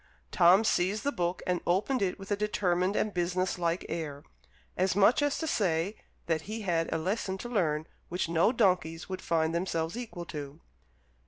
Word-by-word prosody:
Tom 185 +3 +6
seized 200 0 +1
the 285 - +1
book 175 -5 -2
and 180 -1 0
opened 205 +8 +1
it 185 -2 0
with 195 0 -10
a - - +3
determined 195 -2 0
and 215 - 0
business 180 +1 -1
like 170 +1 0
air, 150 -4 -4 0.5
as 185 0 +1
much 205 +8 +5
as 290 -1 +1
to 320 - -2
say 190 - 0 0.3
that 160 -2 0
he 220 +1 -4
had 170 -4 0
a - - +1
lesson 190 +3 -2
to 240 - -6
learn 160 -10 0 0.2
which 180 0 -1
no 165 +6 +3
donkeys 180 -8 +1
would 185 - -4
find 160 -1 +1
themselves 170 -1 -1
equal 225 -8 -6
to. 145 -2 -7
180 Hz, 180 wpm, -30 LUFS, 165-205 Hz, 0.5 s, Tom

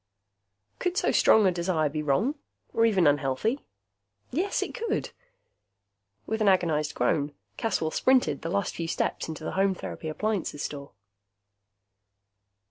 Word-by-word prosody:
Could 360 0 -1
so - - +2
strong 220 -2 +5
a 185 - +5
desire 170 -3 0
be 150 +1 -3
wrong? 170 - +1 0.4
Or 230 - +4
even 190 -6 +3
unhealthy? 145 - +1 0.7
Yes, 355 +10 0
it - - -6
could! 455 -3 -2 1.1
With 220 0 -2
an 215 - +3
agonized 165 -6 +2
groan, 145 +4 0 0.2
Caswell 165 -8 0
sprinted 255 - +2
the 165 - -4
last 200 +2 -1
few 165 - -4
steps - - -1
into 160 0 -6
the - - -3
Home 195 0 +2
Therapy 160 - -6
Appliances 195 -3 -2
Store. 140 -4 -6
175 Hz, 135 wpm, -27 LUFS, 150-220 Hz, 1.1 s, strong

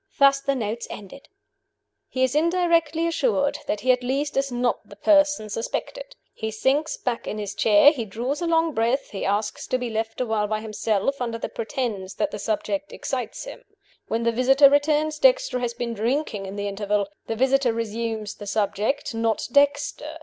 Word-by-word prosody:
Thus 275 0 +5
the 275 0 0
notes 230 -1 -3
ended: 210 +7 -10 0.8
"He 260 - 0
is 260 0 +2
indirectly 335 0 +2
assured 300 -5 +1
that 210 - -1
he 255 - +4
at 250 0 +1
least 275 +4 -1
is 275 -1 0
not 245 0 -1
the - - -11
person 295 -7 +3
suspected. - - -5 0.2
He 220 - -4
sinks 270 +8 0
back 245 -2 -3
in 215 - -3
his 205 -1 -4
chair; 215 +8 +6
he 265 -7 -4
draws 240 - -3
a 345 - -1
long 325 -1 +2
breath; 235 +4 0
he 195 - -5
asks 205 +2 -1
to 255 - +1
be 245 -2 -4
left 225 0 -3
a 255 - +1
while 220 -2 0
by 215 0 -1
himself, 220 +4 -1
under 230 -2 -2
the - - -4
pretense 215 -5 -4
that - - -1
the 210 - -5
subject 200 -1 -2
excites 250 -4 -4
him. - - -9 0.5
When 230 +1 -1
the 235 - +2
visitor 270 +4 +5
returns, 300 +1 +2
Dexter - - +3
has 240 -1 -2
been 235 -1 -3
drinking 225 -2 -1
in 195 - -7
the 205 0 -3
interval. 205 0 -1 0.2
The 225 - -2
visitor 265 +1 +3
resumes 225 -1 -3
the 205 - -10
subject 215 +6 -1
not 225 -1 0
Dexter. 285 +2 +1
245 Hz, 185 wpm, -24 LUFS, 215-285 Hz, 0.8 s, chair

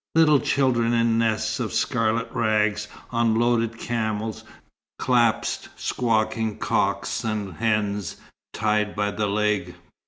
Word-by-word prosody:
Little 155 -3 +6
children 120 -4 +1
in 115 -1 +2
nests 110 -2 0
of - - -2
scarlet 115 +1 0
rags, 105 -2 +1 0.2
on 115 -2 +2
loaded 115 -1 +1
camels, 110 -2 -3 0.5
clasped 120 -3 +1
squawking 110 -2 0
cocks - - -1
and 105 -4 -3
hens, 105 -4 -1 0.4
tied 105 -1 0
by 105 0 0
the 105 0 -1
leg. 105 0 0
110 Hz, 115 wpm, -24 LUFS, 105-115 Hz, 0.5 s, Little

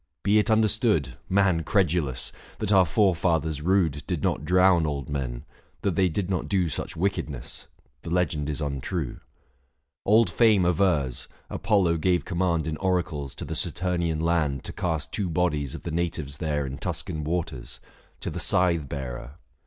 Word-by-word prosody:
Be 105 +2 +4
it 105 - +1
understood, 110 - +2
Man 95 -3 +3
credulous! 80 -7 0 0.3
that 105 -1 -1
our 95 -3 +6
forefathers 80 -5 +1
rude 85 -4 +2
Did 90 -6 -2
not 75 - 0
drown 90 -1 +4
old 70 -3 -3
men 65 -2 -3 0.2
— - - -36
that 95 -4 +1
they 95 0 +3
did 90 +3 -2
not 95 -1 -2
do 95 -4 +1
Such - - -4
wickedness 80 -8 -3 0.2
— - - -39
the - - -7
legend 85 -4 0
is 75 +1 -3
untrue. 70 +1 -3 0.9
710 - - +2
Old 115 +1 +6
Fame 110 -6 +4
avers, 85 -8 +1 0.2
Apollo 95 -6 +2
gave 90 +2 +1
command 85 -3 0
In 80 -1 -3
oracles 85 -7 -1
to - - -6
the - - -4
Satumian 85 -3 0
land 80 -5 +1
To - - -6
cast 80 -4 -2
two 100 -4 -2
bodies 75 -5 0
of - - -9
the 85 - -4
natives 80 -4 -2
there 75 -3 -1
In 65 0 -6
Tuscan 75 -1 -3
waters, 75 -7 -3 0.4
to - - -3
the - - -5
Scythe 85 -6 +3
bearer. 65 -1 -6
85 Hz, 170 wpm, -26 LUFS, 75-95 Hz, 0.9 s, our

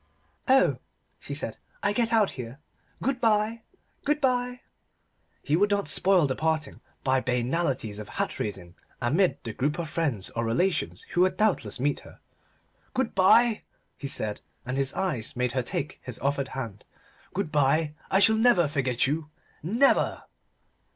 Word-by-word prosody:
"Oh!" 265 0 +4 0.4
she - - -5
said, - - -2 0.3
"I 205 0 +2
get 230 +1 +1
out 220 -4 +3
here. 125 0 -7 0.5
Good 265 0 0
bye, 220 0 +2 0.4
good 295 +1 +1
bye." 250 -2 0 0.8
He 145 - +1
would 205 +5 +3
not 200 -1 0
spoil 185 -3 +3
the 130 -2 -1
parting 160 -2 -1 0.2
by 130 0 +3
banalities 125 -3 -1
of 105 - -8
hat - - -3
raising 95 -5 -4 0.3
amid 165 +10 +2
the 115 - -5
group 145 +6 -1
of 170 -2 -3
friends 140 - 0
or 115 - -2
relations 165 +10 0
who 175 - +2
would 185 0 +3
doubtless 185 - +1
meet 145 +3 +1
her. - - -15 0.8
"Good 260 -3 0
bye," 220 +4 +5 0.3
he 140 - -6
said, 110 -6 -1 0.2
and 125 +1 -3
his 135 0 0
eyes 175 - -2
made 125 0 0
her 130 - 0
take 135 +3 -4
his 125 -3 -4
offered 140 0 -1
hand. 115 -6 -5 0.5
"Good 185 -5 -2
bye. 150 +2 +2 0.2
I - - +3
shall 220 +2 +5
never 220 -8 +4
forget 130 -4 0
you. 150 +2 -2 0.3
Never!" 230 - +2
155 Hz, 160 wpm, -27 LUFS, 130-205 Hz, 0.8 s, bye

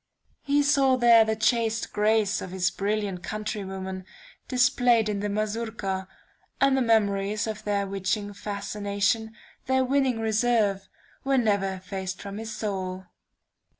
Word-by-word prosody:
He 285 +1 +2
saw 275 -2 +4
there 235 -2 +7
the 220 0 -1
chaste 225 0 0
grace 210 0 +2
of - - -6
his 185 0 0
brilliant 200 -2 -2
countrywomen 190 -2 -5 0.4
displayed 245 -3 +3
in 205 -1 -1
the 205 +1 -2
Mazourka, 210 -2 -3 0.5
and 275 -1 +4
the 265 - +2
memories 210 -3 +1
of 215 -2 -5
their 200 -1 0
witching 200 +2 -2
fascination, 205 +2 -2 0.3
their 260 0 +2
winning 260 -3 +1
reserve, 220 -3 +1 0.3
were 270 0 +2
never 200 -5 +1
effaced 190 0 -6
from 200 +1 -7
his 225 0 -6
soul. 190 -4 -4
215 Hz, 130 wpm, -26 LUFS, 195-230 Hz, 0.5 s, there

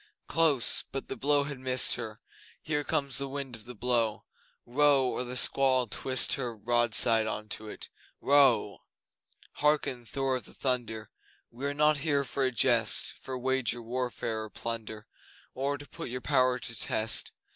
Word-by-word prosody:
Close! 155 -7 +3
But 135 - -5
the - - -3
blow 145 0 +2
has 140 -2 -6
missed 130 0 +3
her, 110 -3 -6 0.4
Here 150 -2 -1
comes 140 -2 0
the 140 0 -3
wind 135 -3 -6
of 110 -1 -12
the 125 0 -8
blow! 115 -1 +1 0.4
Row 140 +1 +3
or 125 - -1
the 125 0 -5
squall'll 130 -1 +2
twist 130 +3 -1
her 125 -5 -3
Broadside 115 -1 +3
on 105 0 -4
to 110 +1 -5
it! - - -8 0.3
Row! 130 -8 +3 0.8
Hearken, 145 -5 +1
Thor 135 0 -1
of 120 - -9
the - - -12
Thunder! 120 -5 -2 0.4
We 130 +4 -4
are 140 - -3
not 150 0 +3
here 145 -1 +1
for 135 +1 -2
a 130 - +1
jest 115 - +3
For 130 -1 -6
wager, 130 -2 -1
warfare, 120 -2 -3
or 110 - -7
plunder, 110 -1 -6 0.5
Or 140 +2 -2
to 145 0 -12
put - - -8
your 125 +1 -4
power 130 -2 +2
to 120 -1 -7
test. 110 0 0
125 Hz, 170 wpm, -29 LUFS, 115-140 Hz, 0.8 s, Close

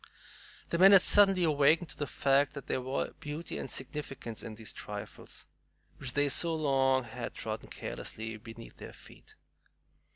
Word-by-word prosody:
The 170 - -1
men 195 +2 +9
had 195 - +8
suddenly 195 -3 +6
awakened 155 +2 +3
to - - -7
the 145 - -3
fact 140 +1 +2
that 140 - -7
there 130 - -1
were 130 +2 -2
beauty 155 +1 -5
and - - -5
significance 135 -4 -5
in 110 -2 -7
these 110 0 -7
trifles, - - -8 0.5
which 125 -3 -4
they 145 - +2
had 145 - +1
so 165 +3 +3
long 135 -4 +2 0.3
trodden - - -5
carelessly 110 0 -6
beneath 115 +1 -12
their - - -10
feet. - - -16
140 Hz, 160 wpm, -31 LUFS, 125-160 Hz, 0.5 s, men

